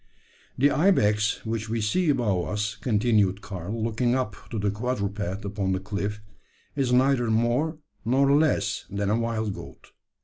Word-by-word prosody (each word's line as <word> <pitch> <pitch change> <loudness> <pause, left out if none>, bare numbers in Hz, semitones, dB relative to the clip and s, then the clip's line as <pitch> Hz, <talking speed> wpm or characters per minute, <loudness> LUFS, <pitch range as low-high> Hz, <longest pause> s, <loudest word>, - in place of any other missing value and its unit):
"The 145 +3 +4
ibex 105 - +2
which 110 -1 -3
we 115 +1 -1
see 155 +11 +1
above 105 -10 +1
us," 105 0 -2
continued 105 -4 +1
Karl, 100 +3 -5
looking 120 +2 +1
up 125 -6 -1
to 115 - -4
the 100 -1 0
quadruped 105 -3 -3
upon 100 -1 -1
the 95 - -1
cliff, 105 +1 -4 0.5
"is 135 -3 0
neither 125 -1 +3
more 120 +8 +1 0.3
nor 135 +4 +3
less 105 -10 +1
than 100 0 -1
a 110 - +2
wild 110 -3 -1
goat. - - -11
110 Hz, 150 wpm, -26 LUFS, 100-125 Hz, 0.5 s, The